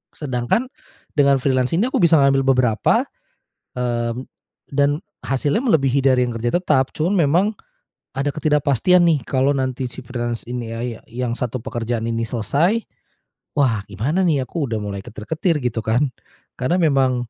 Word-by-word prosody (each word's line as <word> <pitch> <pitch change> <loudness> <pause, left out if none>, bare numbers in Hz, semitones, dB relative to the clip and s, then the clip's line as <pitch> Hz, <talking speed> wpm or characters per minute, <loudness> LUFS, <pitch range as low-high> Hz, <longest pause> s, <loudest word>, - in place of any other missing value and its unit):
Sedangkan 135 - -1 0.4
dengan 140 -2 +4
freelance 130 +1 +1
ini, 215 +9 +2
aku - - 0
bisa 170 -2 +6
ngambil 135 -1 +4
beberapa, 125 - +2 0.7
eee, 120 -1 -1 0.6
dan 145 +2 +1 0.2
hasilnya 140 - 0
melebihi 140 - +2
dari 130 -2 +3
yang 120 - -4
kerja 115 +4 -1
tetap. 140 -7 +1
Cuman 170 +6 0
memang, 170 +3 +3 0.7
ada 135 +1 -2
ketidakpastian 150 +3 +2
nih 155 -6 +2
kalau 135 +4 +1
nanti 130 -1 -2
si 125 +2 -10
freelance 120 -1 -4
ini 120 -1 -5
ya - - -5
ya 120 -2 -4
yang 120 +1 -3
satu 120 0 -3
pekerjaan 115 -1 -3
ini 115 0 -2
selesai, 155 - +1 0.7
"Wah 115 -8 +1
gimana 130 - -1
nih 150 -6 +2
aku 145 +4 -3
udah 110 -4 -3
mulai 100 -1 -5
ketar-ketir," 150 - -2
gitu 115 -3 -2
kan. 125 +6 +2 0.5
Karena 175 +9 +1
memang 130 -6 +2
130 Hz, 155 wpm, -21 LUFS, 120-150 Hz, 0.7 s, bisa